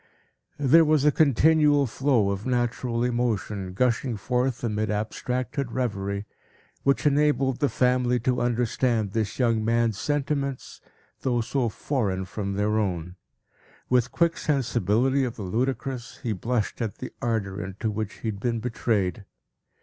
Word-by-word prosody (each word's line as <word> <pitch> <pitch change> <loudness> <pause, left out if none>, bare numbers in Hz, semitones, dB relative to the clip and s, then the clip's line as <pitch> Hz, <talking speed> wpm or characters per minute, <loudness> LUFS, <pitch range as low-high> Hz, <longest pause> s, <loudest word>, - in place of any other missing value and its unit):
There 145 +4 +6
was 155 -2 +3
a 150 - +6
continual 150 0 +4
flow 120 -4 +1
of 100 +4 -4
natural 120 -1 0
emotion, 110 -6 -1
gushing 120 0 +1
forth 125 +3 -1
amid 110 -2 -1
abstracted 125 +5 -2
revery, 100 -5 -2 0.6
which 140 +2 +1
enabled 145 -3 +2
the 145 - +2
family 125 -1 +2
to 125 +1 0
understand 120 -2 0
this 110 -1 -2
young 115 -4 +2
man's 115 -2 +1
sentiments, 140 -2 -2 0.4
though 120 -2 0
so 125 +1 0
foreign 100 -6 -2
from 100 +1 -4
their 105 +2 +1
own. 90 -4 -2 0.8
With 125 -1 +3
quick 170 -1 +1
sensibility 130 - +1
of 125 -2 -3
the 105 - -6
ludicrous, 125 +4 -2
he 115 - 0
blushed 115 +4 -2
at 110 -3 -2
the 130 - -7
ardor 105 -5 -1
into 95 +4 -3
which 105 -1 -5
he 110 - -2
had 100 -2 -5
been 115 +1 -1
betrayed. 105 -5 -1
120 Hz, 140 wpm, -26 LUFS, 105-130 Hz, 0.8 s, There